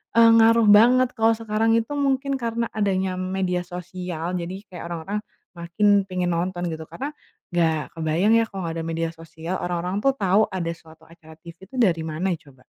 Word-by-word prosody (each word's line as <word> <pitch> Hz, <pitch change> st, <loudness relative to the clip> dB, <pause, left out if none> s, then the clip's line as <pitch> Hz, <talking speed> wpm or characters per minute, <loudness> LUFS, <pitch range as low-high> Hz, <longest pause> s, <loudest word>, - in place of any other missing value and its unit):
eee, 230 Hz, 0 st, +7 dB
ngaruh 225 Hz, 0 st, +5 dB
banget 245 Hz, +4 st, +6 dB
kalau 225 Hz, 0 st, +2 dB
sekarang 225 Hz, 0 st, +1 dB
itu 230 Hz, +3 st, -1 dB
mungkin 275 Hz, -1 st, 0 dB
karena 230 Hz, -1 st, -2 dB
adanya 190 Hz, -3 st, -1 dB
media 185 Hz, -1 st, -1 dB
sosial. 180 Hz, -1 st, -5 dB
Jadi 180 Hz, +2 st, -5 dB
kayak 170 Hz, -1 st, -7 dB
orang-orang 175 Hz, +5 st, -4 dB, 0.3 s
makin 200 Hz, +4 st, +2 dB
pengen 180 Hz, -1 st, -1 dB
nonton 175 Hz, +1 st, -2 dB
gitu. 160 Hz, 0 st, -6 dB
Karena 285 Hz, +3 st, -5 dB, 0.4 s
enggak 160 Hz, -3 st, 0 dB
kebayang 165 Hz, +7 st, +1 dB
ya, 225 Hz, -, 0 dB
kalau 190 Hz, -3 st, -5 dB
enggak 165 Hz, 0 st, -4 dB
ada -, -, -6 dB
media 165 Hz, 0 st, -1 dB
sosial, 165 Hz, +2 st, -6 dB
orang-orang 180 Hz, +3 st, -2 dB
tuh 275 Hz, +3 st, +3 dB
tahu 200 Hz, +1 st, +3 dB
ada 170 Hz, -3 st, -3 dB
suatu 160 Hz, -1 st, -18 dB
acara 160 Hz, -1 st, -16 dB
TV 170 Hz, +4 st, -14 dB
itu -, -, -12 dB
dari 180 Hz, -9 st, +3 dB
mana 160 Hz, +4 st, -2 dB
coba? 140 Hz, -5 st, -13 dB
185 Hz, 180 wpm, -23 LUFS, 170-220 Hz, 0.4 s, eee